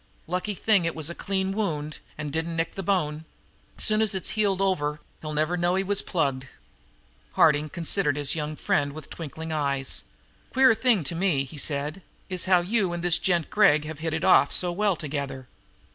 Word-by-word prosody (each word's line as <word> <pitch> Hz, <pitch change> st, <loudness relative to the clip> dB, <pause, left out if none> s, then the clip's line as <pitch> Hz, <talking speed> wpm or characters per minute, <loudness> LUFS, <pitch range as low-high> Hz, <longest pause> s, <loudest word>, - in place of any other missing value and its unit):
Lucky 185 Hz, +4 st, -3 dB
thing 205 Hz, -2 st, +3 dB
it 165 Hz, -, -2 dB
was 160 Hz, +1 st, -2 dB
a -, -, -5 dB
clean 190 Hz, +1 st, -2 dB
wound 155 Hz, -8 st, -3 dB, 0.2 s
and 150 Hz, -2 st, -5 dB
didn't 165 Hz, +1 st, -2 dB
nick 165 Hz, 0 st, -1 dB
the 195 Hz, -, -5 dB
bone. 160 Hz, -5 st, -1 dB, 0.5 s
Soon 215 Hz, -1 st, +3 dB
as 215 Hz, -3 st, +2 dB
it's 190 Hz, -, -1 dB
healed 205 Hz, -3 st, +1 dB
over 150 Hz, -6 st, 0 dB, 0.2 s
he'll 155 Hz, -, -5 dB
never 155 Hz, +4 st, +1 dB
know 175 Hz, +1 st, +1 dB
he 190 Hz, -, +1 dB
was 200 Hz, +1 st, +2 dB
plugged." 135 Hz, -6 st, -1 dB, 0.9 s
Harding 150 Hz, -1 st, +3 dB
considered 165 Hz, -2 st, 0 dB
his 145 Hz, -2 st, 0 dB
young 155 Hz, -1 st, -3 dB
friend 145 Hz, -1 st, 0 dB
with 155 Hz, -1 st, -10 dB
twinkling 160 Hz, 0 st, -7 dB
eyes. 140 Hz, -3 st, -1 dB, 0.5 s
"Queer 260 Hz, -2 st, +6 dB
thing 225 Hz, -6 st, +2 dB
to 145 Hz, -, -2 dB
me," 170 Hz, -5 st, +1 dB
he 135 Hz, +3 st, -11 dB
said, 145 Hz, +5 st, -2 dB, 0.3 s
"is 185 Hz, -2 st, +1 dB
how 185 Hz, -2 st, +4 dB
you 195 Hz, -1 st, 0 dB
and 175 Hz, 0 st, -4 dB
this 175 Hz, -1 st, +4 dB
gent 175 Hz, -4 st, 0 dB
Gregg 155 Hz, -8 st, +4 dB
have 155 Hz, -1 st, -7 dB
hit 160 Hz, 0 st, -2 dB
it 160 Hz, -, -3 dB
off 185 Hz, -, +5 dB
so 180 Hz, -1 st, +3 dB
well 200 Hz, +1 st, +1 dB
together. 140 Hz, -4 st, -5 dB
165 Hz, 190 wpm, -26 LUFS, 150-190 Hz, 0.9 s, Queer